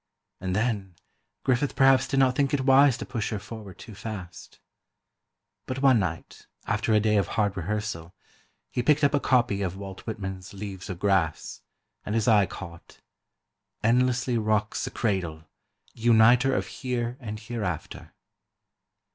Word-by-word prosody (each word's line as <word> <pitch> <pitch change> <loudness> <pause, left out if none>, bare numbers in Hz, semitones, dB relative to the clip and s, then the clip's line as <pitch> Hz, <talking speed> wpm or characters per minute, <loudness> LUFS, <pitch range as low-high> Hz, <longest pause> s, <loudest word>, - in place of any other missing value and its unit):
And 95 0 -2
then, 105 -5 -1 0.5
Griffith 135 +2 +1
perhaps 135 -1 +5
did 135 - 0
not 130 -1 +4
think 140 0 +1
it 135 - -1
wise 135 -1 +6
to - - -6
push 115 -5 -3
her 110 - -2
forward 100 -1 -9
too 110 - -11
fast. 95 -5 -8 1.1
But 130 +1 -4
one 130 -4 +6
night, 85 -4 -5 0.2
after - - 0
a 110 - +5
day 105 0 +2
of 100 -4 +2
hard 105 -2 0
rehearsal, 95 -2 -4 0.6
he 125 - -1
picked 150 +4 +3
up 145 - +4
a 145 - +3
copy 120 -7 +2
of 95 -1 -3
Walt 95 -1 -8
Whitman's 95 -3 -6
"Leaves 95 -2 -7
of 95 - -4
Grass," 95 -5 0 0.4
and 105 - -3
his 115 -2 +1
eye 105 -4 +5
caught:... 85 -4 -11 0.8
endlessly 125 +1 +2
rocks 110 -1 0
the - - -4
cradle, 90 -8 -2 0.5
Uniter 120 +3 +4
of - - -1
Here 125 -2 -3
and 110 -4 -6
Hereafter. 105 -7 -5
110 Hz, 150 wpm, -26 LUFS, 95-125 Hz, 1.1 s, wise